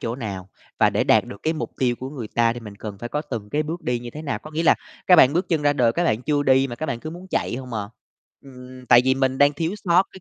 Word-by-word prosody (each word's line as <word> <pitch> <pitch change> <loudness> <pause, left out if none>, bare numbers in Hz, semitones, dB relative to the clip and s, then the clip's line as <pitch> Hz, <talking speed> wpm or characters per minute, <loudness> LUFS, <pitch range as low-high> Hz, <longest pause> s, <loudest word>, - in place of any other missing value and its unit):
chỗ 115 +2 -3
nào, 100 -6 -6 0.3
và - - +4
để - - 0
đạt - - +4
được 100 - -11
cái 160 - +1
mục 160 - -4
tiêu 125 -2 +1
của 130 +2 -7
người 125 -7 -7
ta 115 0 +2
thì 120 - -8
mình 105 -2 -10
cần 105 -2 -8
phải 120 - -6
có 150 +3 -2
từng 115 -8 -6
cái 150 - 0
bước 165 +4 -5
đi 125 -1 -1
như 120 0 -8
thế 150 - -8
nào. 140 -9 -3
Có 155 +7 -12
nghĩa 160 +2 -2
là 165 - +5 0.3
các 180 - +7
bạn 135 -2 +7
bước 175 +3 -1
chân 160 -3 0
ra 145 0 +3
đời 120 -5 +2
các 175 - 0
bạn 115 -7 0
chưa 145 +1 +1
đi 135 0 +4
mà 120 -2 -7
các 155 - -4
bạn 120 -5 -3
cứ 155 - -6
muốn 175 +3 -10
chạy - - -1
hông 130 -1 -8
à. 100 -2 -3 0.5
Ừm, 130 -1 -13
tại 120 - +7
vì 130 0 +3
mình 130 0 0
đang 145 0 +5
thiếu 165 +5 -2
sót 175 0 +5
cái 190 - -12
130 Hz, 310 wpm, -23 LUFS, 120-155 Hz, 0.5 s, các